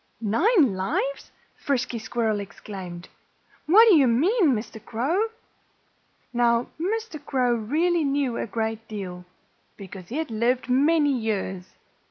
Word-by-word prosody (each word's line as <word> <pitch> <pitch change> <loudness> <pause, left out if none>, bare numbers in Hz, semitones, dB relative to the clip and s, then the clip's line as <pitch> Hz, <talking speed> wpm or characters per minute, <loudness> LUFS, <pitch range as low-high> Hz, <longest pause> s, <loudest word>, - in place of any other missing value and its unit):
"Nine 275 - +3
lives!" 370 - -2 0.2
Frisky 260 -4 -2
Squirrel 220 -1 -1
exclaimed. 190 -3 -8 0.6
"What 435 +8 +7
do 395 - +7
you 280 -4 +5
mean, 315 - +3
Mr. 215 0 -7
Crow?" 310 - 0 1.1
Now, 235 0 +2
Mr. 395 -3 -3
Crow 255 -4 +1
really 315 +10 +1
knew 275 -3 0
a - - -3
great 225 0 -3
deal, 180 -4 -7 0.5
because 190 -2 -10
he 255 - -4
had 320 -6 -3
lived 240 +4 0
many 290 +3 +3
years. 195 -5 -3
240 Hz, 125 wpm, -25 LUFS, 215-310 Hz, 1.1 s, What